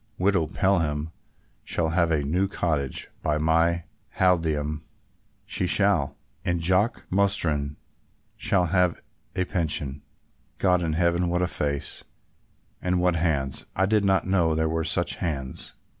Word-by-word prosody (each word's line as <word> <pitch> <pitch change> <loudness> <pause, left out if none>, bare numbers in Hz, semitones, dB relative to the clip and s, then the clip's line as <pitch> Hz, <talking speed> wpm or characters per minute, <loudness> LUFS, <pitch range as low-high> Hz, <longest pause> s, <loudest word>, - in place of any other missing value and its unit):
Widow 95 -4 +2
Pelham 80 -6 0 0.5
shall 80 -2 0
have 85 0 +2
a 75 -3 +1
new 90 +7 +1
cottage, 75 -8 -2
by 75 -1 +1
my 80 +2 +2 0.3
halidame 80 -5 +1 0.6
she 90 - -1
shall; 95 -7 +2 0.3
and 85 -1 0
Jock 95 +7 +1
Mostyn 80 -7 +1 0.6
shall 90 -3 +1
have 90 0 +1 0.3
a 90 - +1
pension. 75 -6 -1 0.6
God 90 -2 +3
in 80 -2 -1
heaven, 85 +1 +2
what 90 +1 +1
a - - +2
face, 70 -4 -1 0.8
and 90 0 +1
what 90 -1 +2
hands! 75 -5 0
I 95 - +3
did 105 +1 +2
not 95 -1 +2
know 85 -4 +2
there 80 0 +1
were 80 +1 -1
such 85 +2 +1
hands." 70 -7 -4
85 Hz, 135 wpm, -26 LUFS, 75-90 Hz, 0.8 s, God